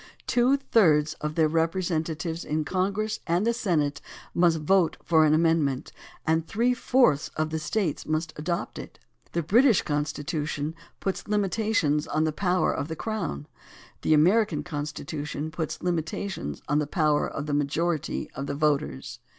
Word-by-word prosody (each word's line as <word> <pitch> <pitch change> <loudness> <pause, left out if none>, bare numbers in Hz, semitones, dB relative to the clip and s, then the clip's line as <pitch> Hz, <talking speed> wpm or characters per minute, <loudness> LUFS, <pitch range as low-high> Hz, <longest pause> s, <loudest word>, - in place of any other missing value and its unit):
Two 250 +3 +3
thirds 155 - +3
of 150 0 -3
their 160 -2 +4
representatives 165 0 -1
in 155 0 -1
Congress 200 +4 -1
and 175 +5 +1
the 235 - +2
Senate 160 -11 0 0.3
must 170 -2 +3
vote 170 +3 +2
for 160 -2 +4
an 150 - +4
amendment, 155 -5 +1 0.3
and 160 0 +1
three 240 +4 +2
fourths 245 - +3
of 155 0 -1
the 160 - -1
States 170 0 -2
must 155 0 -1
adopt 170 +5 -3
it. - - -10 0.4
The 170 - 0
British 225 - +4
Con 145 0 0
stitution 150 0 -3 0.3
puts 195 - -3
limitations 205 -7 +1
on 155 +1 0
the 160 - +1
power 180 +3 +1
of 140 - -3
the 160 - -4
crown; 155 - -3 0.6
the 155 - +3
American 170 0 +3
Constitution 150 -1 -4
puts 160 0 -4
limitations 165 - -3
on 145 +1 +2
the 150 - -1
power 150 -2 +2
of 140 - -5
the 150 - -2
majority 150 +3 -1
of 135 +1 -5
the 140 - -3
voters. 145 - -1
160 Hz, 155 wpm, -26 LUFS, 150-185 Hz, 0.6 s, their